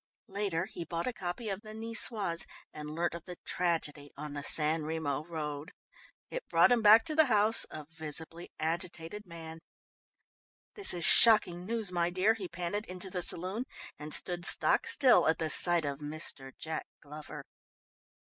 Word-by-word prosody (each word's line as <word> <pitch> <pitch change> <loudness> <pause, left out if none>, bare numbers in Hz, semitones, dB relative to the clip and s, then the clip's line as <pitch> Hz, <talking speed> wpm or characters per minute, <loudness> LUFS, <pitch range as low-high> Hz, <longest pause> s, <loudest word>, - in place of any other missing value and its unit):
Later 195 -4 -2
he 175 - -7
bought 170 0 -4
a 255 - -2
copy 180 +3 -5
of 195 0 -4
the 215 -1 -11
Nicoise 220 -5 0 0.3
and 150 0 -8
learnt 170 0 -1
of 170 -1 -8
the 180 -2 -9
tragedy 155 -5 -2
on 150 0 -7
the 145 -1 -6
San 155 +2 +3
Remo 155 -2 -3
road. 155 -1 -6 0.6
It - - -6
brought - - +4
him 240 -2 +3
back 220 +1 +7
to 310 - -3
the 315 0 +5
house, 215 -1 +3
a 155 - -9
visibly 160 +2 -5
agitated 170 +4 -4
man. 165 -1 -10 1.1
"This 405 - 0
is 170 -2 +2
shocking 185 -6 +6
news, 225 -4 -2
my 175 -1 0
dear," 185 +5 +2
he 205 -5 -6
panted 175 +5 -4
into 185 +1 -5
the 180 - -3
saloon 185 +8 0 0.3
and 150 0 -8
stood 175 +2 -2
stock 460 - +3
still 275 - +4
at 160 - +2
the 160 -2 -1
sight 175 -3 +4
of 140 -1 -4
Mr. 145 -3 -2
Jack 160 0 -5
Glover. 150 +1 -10
175 Hz, 165 wpm, -31 LUFS, 160-205 Hz, 1.1 s, back